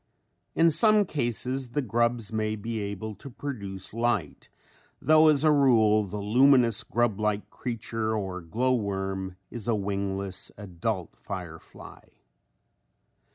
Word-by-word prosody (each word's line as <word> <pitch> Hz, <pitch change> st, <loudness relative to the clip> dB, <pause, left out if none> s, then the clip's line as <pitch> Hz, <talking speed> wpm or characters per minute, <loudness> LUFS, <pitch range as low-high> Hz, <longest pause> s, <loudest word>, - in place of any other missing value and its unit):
In 165 Hz, 0 st, +5 dB
some 215 Hz, +4 st, +4 dB
cases 125 Hz, -, -3 dB
the 145 Hz, -, +1 dB
grubs 120 Hz, -1 st, 0 dB
may 110 Hz, 0 st, 0 dB
be 110 Hz, +2 st, -4 dB
able 100 Hz, +1 st, -4 dB
to 105 Hz, +8 st, -11 dB
produce 100 Hz, -9 st, -6 dB
light 115 Hz, -9 st, -1 dB, 0.5 s
though 155 Hz, 0 st, +5 dB
as 150 Hz, -2 st, +4 dB
a 155 Hz, -, +5 dB
rule 110 Hz, -7 st, +4 dB
the 100 Hz, +2 st, -6 dB
luminous 120 Hz, +2 st, +4 dB
grub 120 Hz, -3 st, 0 dB
like 105 Hz, -1 st, -1 dB
creature 115 Hz, -2 st, -3 dB
or 95 Hz, -3 st, -3 dB
glow 120 Hz, +10 st, 0 dB
worm 95 Hz, -4 st, -2 dB, 0.2 s
is 120 Hz, -3 st, -7 dB
a 115 Hz, -, +2 dB
wingless 100 Hz, -1 st, -3 dB
adult 95 Hz, -1 st, -4 dB
firefly. -, -, -9 dB
110 Hz, 125 wpm, -27 LUFS, 100-125 Hz, 0.5 s, In